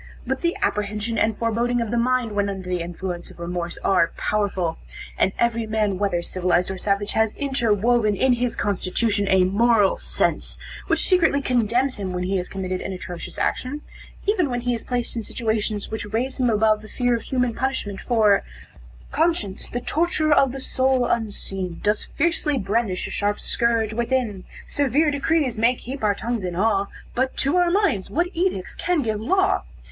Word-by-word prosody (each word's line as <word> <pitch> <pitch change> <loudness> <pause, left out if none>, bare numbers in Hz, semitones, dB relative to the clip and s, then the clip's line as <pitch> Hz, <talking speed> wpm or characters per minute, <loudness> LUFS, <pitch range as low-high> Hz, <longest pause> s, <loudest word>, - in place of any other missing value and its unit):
But - - -2
the 340 0 0
apprehension 210 +2 -1
and 220 -1 +1
foreboding 235 +2 0
of 230 -2 -2
the - - 0
mind, 250 -1 +1
when 205 -1 0
under 190 -2 -5
the 180 -1 -1
influence 175 +1 -5
of - - -15
remorse, 170 0 -4
are 185 -3 +3
powerful, 190 -6 -1 0.4
and 190 - +2
every 230 -1 +1
man, 210 -3 0
whether 185 -4 0
civilized 180 0 0
or 190 - -5
savage, 200 +1 0
has 220 -1 +1
interwoven 235 -5 +2
in 255 +6 +3
his 245 0 -1
constitution 205 +1 0
a 190 -1 +4
moral 205 +2 +3
sense, - - -1 0.3
which - - +2
secretly 335 -6 +4
condemns 250 0 +1
him 190 -3 -4
when 180 0 -2
he 190 +2 0
has 180 - -4
committed 185 -1 -3
an 195 - -4
atrocious 180 -1 -7
action, 285 +4 -1 0.4
even 375 -7 +2
when 245 -1 -2
he 245 0 0
is 230 - -3
placed 245 -1 -1
in 230 - -1
situations 220 -2 -2
which 215 -2 -4
raise 255 +5 -1
him 250 -2 +3
above 215 -1 +3
the 215 - -12
fear 245 +1 +1
of 230 - -3
human 250 -2 0
punishment, 240 -6 -2
for 215 -4 +3 0.7
"Conscience, 310 - 0
the 245 - -3
torturer 310 +1 +1
of 270 -3 +4
the 270 - -6
soul, 260 -1 +1
unseen. 195 -6 -2
Does 210 +1 +1
fiercely 305 -2 0
brandish 205 -2 -1
a - - -6
sharp 205 0 0
scourge 230 -2 +1
within; 235 -4 -1 0.2
Severe 285 +2 +2
decrees 285 -4 0
may 235 +3 +4
keep 260 +1 -7
our 205 -1 +3
tongues 230 0 -3
in 180 -1 -3
awe, 200 0 +2 0.3
But 260 +1 -1
to 290 +6 +2
our 355 -1 +4
minds 345 - +1
what 345 +4 0
edicts 345 - -1
can 345 -4 0
give 215 -2 -2
law? 380 - +2
225 Hz, 180 wpm, -23 LUFS, 200-255 Hz, 0.7 s, a